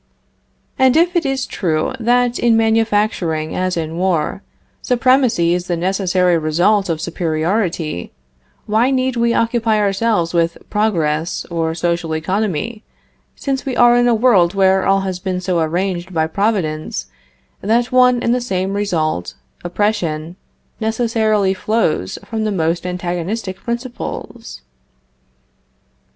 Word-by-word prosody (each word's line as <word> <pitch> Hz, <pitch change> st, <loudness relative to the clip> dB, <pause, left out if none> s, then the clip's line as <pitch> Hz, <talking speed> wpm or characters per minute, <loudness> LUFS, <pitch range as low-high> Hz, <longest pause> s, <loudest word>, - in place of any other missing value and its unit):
And 260 Hz, +2 st, +4 dB
if 350 Hz, +2 st, +3 dB
it 335 Hz, -4 st, +1 dB
is 270 Hz, -1 st, -1 dB
true 160 Hz, 0 st, -1 dB
that 245 Hz, +1 st, +2 dB
in 235 Hz, -2 st, +3 dB
manufacturing 210 Hz, -8 st, +1 dB
as 185 Hz, -1 st, -1 dB
in 165 Hz, 0 st, -3 dB
war, 180 Hz, 0 st, 0 dB, 0.4 s
supremacy 250 Hz, -8 st, +2 dB
is 180 Hz, 0 st, -2 dB
the 175 Hz, -, -1 dB
necessary 180 Hz, -1 st, +1 dB
result 175 Hz, +6 st, +2 dB
of 165 Hz, -2 st, -1 dB
superiority, 165 Hz, -, -2 dB, 0.5 s
why 220 Hz, +4 st, +2 dB
need 260 Hz, -1 st, 0 dB
we 235 Hz, 0 st, +1 dB
occupy 230 Hz, -1 st, +1 dB
ourselves 200 Hz, -3 st, +1 dB
with 170 Hz, -1 st, +1 dB
progress 170 Hz, -7 st, 0 dB
or 165 Hz, -1 st, -1 dB
social 170 Hz, -1 st, -1 dB
economy, 200 Hz, +5 st, -2 dB, 0.5 s
since 270 Hz, -1 st, -3 dB
we 265 Hz, -3 st, -3 dB
are 240 Hz, 0 st, +6 dB
in 245 Hz, 0 st, +3 dB
a 240 Hz, -, +4 dB
world 200 Hz, -7 st, +3 dB
where 190 Hz, -1 st, +3 dB
all 195 Hz, 0 st, +3 dB
has 190 Hz, -2 st, -3 dB
been 185 Hz, -1 st, -3 dB
so 180 Hz, -1 st, -1 dB
arranged 175 Hz, +2 st, -2 dB
by 160 Hz, -2 st, +1 dB
Providence 165 Hz, -4 st, -1 dB, 0.6 s
that 235 Hz, +4 st, +1 dB
one 250 Hz, -1 st, +4 dB
and 235 Hz, -, +2 dB
the 250 Hz, -, 0 dB
same 190 Hz, -4 st, -2 dB
result, 160 Hz, -, -1 dB, 0.3 s
oppression, 175 Hz, -4 st, -1 dB, 0.4 s
necessarily 220 Hz, -3 st, +1 dB
flows 190 Hz, -, -1 dB
from 220 Hz, -1 st, -3 dB
the 215 Hz, -, 0 dB
most 170 Hz, -1 st, -1 dB
antagonistic 180 Hz, +3 st, -3 dB
principles? 235 Hz, -, -6 dB
195 Hz, 130 wpm, -18 LUFS, 170-230 Hz, 0.6 s, are